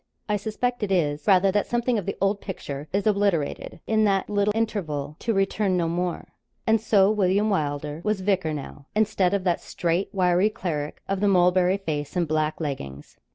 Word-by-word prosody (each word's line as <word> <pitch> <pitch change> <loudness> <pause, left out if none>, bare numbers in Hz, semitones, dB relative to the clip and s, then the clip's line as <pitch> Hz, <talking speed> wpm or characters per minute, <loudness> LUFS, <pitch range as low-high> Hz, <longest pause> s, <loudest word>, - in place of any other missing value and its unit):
I 210 - +1
suspect 230 +4 -2
it 205 -2 -2
is, 150 -5 0
rather, 195 -1 +5
that 205 +1 0
something 240 -1 0
of 200 - -7
the 200 - -3
old 195 +1 +1
picture 145 -6 -6
is 200 +1 0
obliterated, 200 -7 0
in 220 -1 +2
that 195 0 +1
little 205 0 +2
interval, 165 -11 -2
to 230 - -1
return 195 -1 +1
no 170 -2 +1
more. 175 +1 -2 0.4
And 220 -1 +3
so 205 -3 +4
William 205 +1 +2
Wylder 150 -2 -2
was 210 -2 0
vicar 185 -4 +1
now 145 -1 -7
instead 200 -3 +2
of 195 - -2
that 175 -2 +1
straight 175 +3 -1
wiry 185 +1 +3
cleric 155 -8 -4
of 195 -1 -1
the 205 - +2
mulberry 180 0 +4
face 155 -6 -4
and 175 -2 +1
black 155 0 0
leggings. 75 - -6
190 Hz, 185 wpm, -25 LUFS, 160-205 Hz, 0.4 s, rather